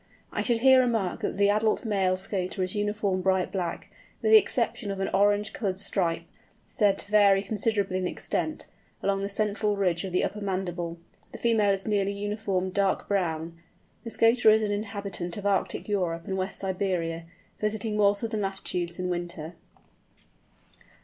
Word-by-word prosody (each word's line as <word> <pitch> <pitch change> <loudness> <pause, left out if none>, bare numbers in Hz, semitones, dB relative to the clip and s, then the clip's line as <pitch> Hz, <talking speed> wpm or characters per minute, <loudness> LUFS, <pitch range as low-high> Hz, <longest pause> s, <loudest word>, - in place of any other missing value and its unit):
I - - -1
should 235 -2 0
here 260 0 +7
remark 225 -7 0
that - - -3
the 200 0 +4
adult 215 +2 +1
male 190 -4 +1
Scoter 185 0 -2
is 185 - -1
uniform 205 -2 -1
bright 190 -1 +1
black, 175 -4 -4 0.3
with 440 - +2
the 440 - +11
exception 230 - 0
of 195 -1 -3
an 195 - -1
orange 205 +1 +2
coloured 205 -10 -2
stripe—said 195 +2 -2
to 205 - -6
vary 200 -2 +5
considerably 200 -2 0
in 185 - -1
extent—along 195 +2 -4
the 200 - -2
central 210 0 0
ridge 180 -3 +1
of 190 - -5
the 180 - +1
upper 210 - -3
mandible. 175 -3 -3 0.4
The - - -6
female 225 -3 +2
is 195 -1 -1
nearly 200 -2 +1
uniform 200 -2 -2
dark 195 0 0
brown. 165 -4 -2 0.4
The 230 - -6
Scoter 230 0 +4
is 220 0 +5
an 210 - 0
inhabitant 200 -4 -3
of 205 - -7
Arctic 200 -1 0
Europe 175 -5 -1
and 190 - -3
West 190 +1 -3
Siberia, 180 -4 -2 0.3
visiting 215 0 -2
more 205 -1 +4
southern 220 0 -2
latitudes 180 -3 -2
in 180 0 -2
winter. 175 -2 -4
200 Hz, 165 wpm, -27 LUFS, 185-210 Hz, 0.4 s, the